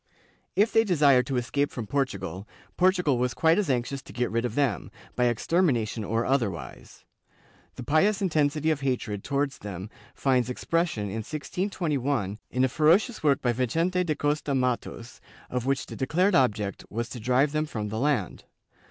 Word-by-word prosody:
If 210 Hz, +3 st, +3 dB
they 225 Hz, -, +5 dB
desired 140 Hz, -, +4 dB
to 135 Hz, -, -1 dB
escape 140 Hz, +4 st, 0 dB
from 120 Hz, -, -6 dB
Portugal, 100 Hz, -8 st, -3 dB, 0.3 s
Portugal 180 Hz, -8 st, +2 dB
was 125 Hz, 0 st, 0 dB
quite 165 Hz, +4 st, +3 dB
as 200 Hz, -, -1 dB
anxious 130 Hz, +1 st, -1 dB
to -, -, -13 dB
get 120 Hz, 0 st, -2 dB
rid 115 Hz, +2 st, 0 dB
of 120 Hz, -2 st, -3 dB
them, 135 Hz, -9 st, 0 dB, 0.3 s
by 125 Hz, -, +2 dB
extermination 120 Hz, -, +1 dB
or 115 Hz, +3 st, -1 dB
otherwise. 115 Hz, -10 st, -3 dB, 0.7 s
The 125 Hz, -, -7 dB
pious 160 Hz, -, +2 dB
intensity 155 Hz, -4 st, +1 dB
of 145 Hz, -2 st, -2 dB
hatred 120 Hz, -7 st, -2 dB
towards 140 Hz, 0 st, -1 dB
them 100 Hz, 0 st, -7 dB, 0.2 s
finds 125 Hz, -3 st, +1 dB
expression, 165 Hz, -2 st, -1 dB
in 100 Hz, +2 st, -4 dB
1621, 145 Hz, -, -2 dB
in 125 Hz, 0 st, 0 dB
a -, -, +5 dB
ferocious 170 Hz, -, +2 dB
work 140 Hz, -3 st, +2 dB
by 120 Hz, -2 st, +2 dB
Vicente 165 Hz, +10 st, 0 dB
da 155 Hz, -4 st, -1 dB
Costa 145 Hz, -1 st, -1 dB
Mattos, 125 Hz, -2 st, -2 dB, 0.3 s
of 125 Hz, 0 st, -2 dB
which 135 Hz, 0 st, 0 dB
the -, -, -9 dB
declared 180 Hz, +9 st, +1 dB
object 105 Hz, -, +1 dB
was 115 Hz, +2 st, -3 dB
to 125 Hz, -, -7 dB
drive 125 Hz, +5 st, +2 dB
them 155 Hz, +1 st, -1 dB
from 105 Hz, -6 st, -4 dB
the 110 Hz, +1 st, -3 dB
land. 130 Hz, -, -1 dB
135 Hz, 170 wpm, -27 LUFS, 120-155 Hz, 0.7 s, they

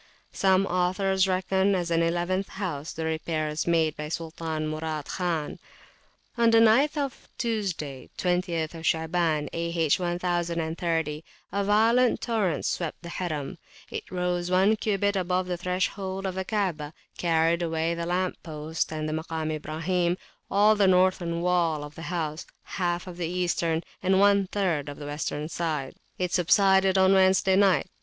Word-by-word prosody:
Some 190 Hz, 0 st, +3 dB
authors 190 Hz, +1 st, +1 dB
reckon, 190 Hz, +1 st, +1 dB
as 175 Hz, -2 st, -2 dB
an 165 Hz, 0 st, +3 dB
eleventh 175 Hz, +3 st, 0 dB
house, 165 Hz, -7 st, -4 dB
the 160 Hz, -, -4 dB
repairs 155 Hz, -1 st, -2 dB
made 160 Hz, -2 st, +2 dB
by 150 Hz, 0 st, -5 dB
Sultan 160 Hz, -1 st, -4 dB
Murad 155 Hz, -1 st, -3 dB
Khan. 170 Hz, -5 st, -2 dB, 0.8 s
On 230 Hz, -1 st, +5 dB
the 230 Hz, 0 st, +6 dB
night 235 Hz, +8 st, +4 dB
of 280 Hz, -3 st, -3 dB
Tuesday, 190 Hz, -, -3 dB
20th 175 Hz, -3 st, 0 dB
Shaaban, 160 Hz, -2 st, +1 dB
A.H. 165 Hz, -2 st, +1 dB
1030, 170 Hz, -3 st, -1 dB, 0.3 s
a 200 Hz, 0 st, 0 dB
violent 225 Hz, +5 st, +3 dB
torrent 205 Hz, -, -1 dB
swept 170 Hz, 0 st, -3 dB
the 170 Hz, -, -7 dB
Harim; 155 Hz, -6 st, -4 dB, 0.3 s
it -, -, -6 dB
rose 180 Hz, -1 st, -1 dB
one 190 Hz, +4 st, +4 dB
cubit 205 Hz, -1 st, 0 dB
above 185 Hz, 0 st, 0 dB
the 180 Hz, -1 st, -2 dB
threshold 190 Hz, +2 st, -2 dB
of 190 Hz, -, -2 dB
the 190 Hz, 0 st, -3 dB
Kaabah, 175 Hz, -9 st, -2 dB, 0.3 s
carried 165 Hz, 0 st, +2 dB
away 165 Hz, 0 st, 0 dB
the 170 Hz, 0 st, -4 dB
lamp 180 Hz, +1 st, -1 dB
posts 155 Hz, 0 st, -3 dB
and 155 Hz, -1 st, -3 dB
the 155 Hz, -, -2 dB
[p.325] 160 Hz, +1 st, -3 dB
Makam 160 Hz, -2 st, -2 dB
Ibrahim, 170 Hz, +4 st, -1 dB, 0.3 s
all 210 Hz, +2 st, +5 dB
the 200 Hz, -2 st, +3 dB
northern 180 Hz, -2 st, +2 dB
wall 170 Hz, -4 st, +1 dB
of 145 Hz, 0 st, -9 dB
the 160 Hz, -, -10 dB
house, 160 Hz, -2 st, -3 dB, 0.2 s
half 175 Hz, -1 st, -2 dB
of 180 Hz, -2 st, -9 dB
the 175 Hz, -2 st, -2 dB
eastern, 170 Hz, -2 st, 0 dB, 0.2 s
and 190 Hz, 0 st, +3 dB
one 200 Hz, -1 st, +4 dB
third 175 Hz, -8 st, -1 dB
of 145 Hz, -, -8 dB
the 145 Hz, -, -8 dB
western 150 Hz, 0 st, -3 dB
side. 155 Hz, -5 st, -3 dB, 0.2 s
It 180 Hz, -1 st, -2 dB
subsided 190 Hz, +1 st, +4 dB
on 190 Hz, 0 st, +5 dB
Wednesday 190 Hz, 0 st, +4 dB
night. 195 Hz, -2 st, +4 dB
175 Hz, 155 wpm, -27 LUFS, 160-190 Hz, 0.8 s, the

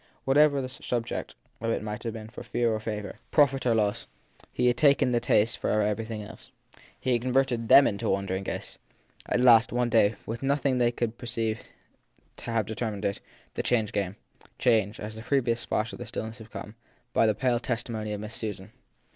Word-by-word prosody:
Whatever 140 Hz, 0 st, +4 dB
the 130 Hz, -, -4 dB
subject 120 Hz, -2 st, -4 dB, 0.2 s
of 115 Hz, -, -2 dB
it 115 Hz, -, -1 dB
might 105 Hz, 0 st, -5 dB
have 115 Hz, -2 st, -4 dB
for -, -, -6 dB
them 110 Hz, 0 st, -9 dB
of -, -, -8 dB
fear 120 Hz, -2 st, +1 dB
or 110 Hz, -, -1 dB
favour, 105 Hz, -1 st, -5 dB
profit 135 Hz, -4 st, +3 dB
or 115 Hz, -, +3 dB
loss, 105 Hz, -2 st, 0 dB, 0.4 s
he 125 Hz, -, 0 dB
had 125 Hz, 0 st, +4 dB
taken 140 Hz, -3 st, +4 dB
the 120 Hz, -, +2 dB
taste 110 Hz, 0 st, +2 dB
from 105 Hz, -, +1 dB
every 105 Hz, +1 st, 0 dB
thing 110 Hz, -2 st, -5 dB
else. 105 Hz, -, -11 dB, 0.5 s
He 130 Hz, -, 0 dB
had 120 Hz, -, +1 dB
converted 125 Hz, -2 st, +1 dB
them 140 Hz, -, +9 dB
into 100 Hz, -, -1 dB
wandering 95 Hz, 0 st, -1 dB
ghosts. -, -, -5 dB, 0.5 s
At -, -, +1 dB
last, 115 Hz, -3 st, +6 dB
one 125 Hz, 0 st, +1 dB
day, 110 Hz, -1 st, +4 dB
with 115 Hz, +1 st, -5 dB
nothing 135 Hz, -1 st, +1 dB
they 120 Hz, -1 st, +3 dB
could 120 Hz, -1 st, -2 dB
afterwards 120 Hz, -, -29 dB
per 125 Hz, -, -8 dB
ceive 115 Hz, -2 st, -1 dB, 0.8 s
to -, -, -10 dB
have 115 Hz, -2 st, +1 dB
determined 110 Hz, -1 st, -4 dB
it, 100 Hz, -, -1 dB, 0.3 s
the -, -, -1 dB
change 110 Hz, -4 st, +1 dB
came 100 Hz, -2 st, -2 dB, 0.4 s
came, 110 Hz, -4 st, +3 dB
as 105 Hz, +1 st, -6 dB
the 110 Hz, -, -7 dB
previous 120 Hz, -2 st, +1 dB
splash -, -, -2 dB
in -, -, -7 dB
their -, -, -7 dB
stillness 115 Hz, +2 st, -5 dB
had 110 Hz, 0 st, -12 dB
come, 105 Hz, -, -8 dB, 0.4 s
by 115 Hz, -, +4 dB
the 110 Hz, -, +2 dB
pale 125 Hz, 0 st, +1 dB
testi 120 Hz, 0 st, -2 dB
mony 110 Hz, -1 st, -3 dB
of 105 Hz, -1 st, -4 dB
Miss 105 Hz, +1 st, -6 dB
Susan. 105 Hz, -3 st, -4 dB
115 Hz, 215 wpm, -27 LUFS, 105-125 Hz, 0.8 s, them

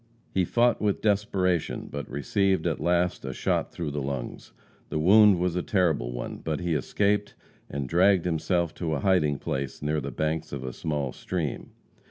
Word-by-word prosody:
He 95 Hz, -2 st, +2 dB
fought 120 Hz, +5 st, +2 dB
with 105 Hz, -2 st, 0 dB
desperation, 95 Hz, -5 st, 0 dB
but 70 Hz, 0 st, -5 dB
received, 95 Hz, +6 st, 0 dB
at -, -, 0 dB
last, 90 Hz, 0 st, +1 dB
a 65 Hz, -1 st, -4 dB
shot -, -, -1 dB
through 80 Hz, -4 st, -4 dB
the 70 Hz, 0 st, -3 dB
lungs. 70 Hz, -3 st, -5 dB, 0.4 s
The -, -, -2 dB
wound 100 Hz, +4 st, +6 dB
was 90 Hz, 0 st, 0 dB
a 90 Hz, -, +1 dB
terrible 85 Hz, -, +1 dB
one, -, -, -5 dB
but 80 Hz, -2 st, -3 dB
he 85 Hz, -2 st, -1 dB
escaped, 105 Hz, +7 st, 0 dB, 0.3 s
and 70 Hz, -1 st, -3 dB
dragged 90 Hz, +4 st, +4 dB
himself 85 Hz, 0 st, 0 dB
to 80 Hz, -3 st, -1 dB
a 70 Hz, -, -3 dB
hiding 80 Hz, -7 st, +2 dB
place 70 Hz, -1 st, -4 dB
near 75 Hz, +1 st, 0 dB
the 70 Hz, -, -4 dB
banks 80 Hz, +2 st, -2 dB
of 70 Hz, -2 st, -4 dB
a 65 Hz, -1 st, -5 dB
small 75 Hz, -3 st, -2 dB
stream. 85 Hz, -6 st, -4 dB
85 Hz, 180 wpm, -27 LUFS, 70-95 Hz, 0.4 s, wound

